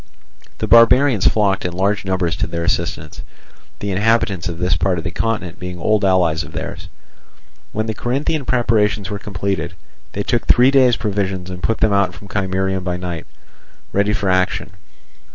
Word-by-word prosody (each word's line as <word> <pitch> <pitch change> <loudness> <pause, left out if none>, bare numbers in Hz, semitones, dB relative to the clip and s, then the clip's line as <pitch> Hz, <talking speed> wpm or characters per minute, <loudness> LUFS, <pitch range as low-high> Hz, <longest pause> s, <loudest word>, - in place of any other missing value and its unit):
The - - -2
barbarians 115 -1 +5
flocked 100 -3 +2
in 90 - -3
large 100 +3 0
numbers 90 -3 0
to 95 - -1
their 85 0 -3
assistance, 80 -3 -2 0.6
the 100 - -2
inhabitants 100 -3 +1
of 85 - -5
this 90 +1 +1
part 95 -2 0
of 80 - -4
the 85 - -4
continent 105 -4 -3
being 90 0 -6
old 105 +4 +1
allies 90 -5 +2
of - - -12
theirs. - - -6 0.8
When 110 +1 -2
the 110 - -2
Corinthian 135 +6 -2
preparations 110 -4 +1
were 100 - -3
completed, 100 -2 -3 0.4
they 100 - -2
took 120 +2 -1
three 125 +2 +5
days' 130 -3 +5
provisions 100 -3 -2
and 90 0 -7
put 115 +5 0
out 100 -3 +2
from 100 - -13
Chimerium 95 -1 -1
by 90 -1 -2
night, 90 -2 -5 0.7
ready 100 +1 +2
for 100 -1 -1
action. 95 +2 0
100 Hz, 170 wpm, -19 LUFS, 90-110 Hz, 0.8 s, barbarians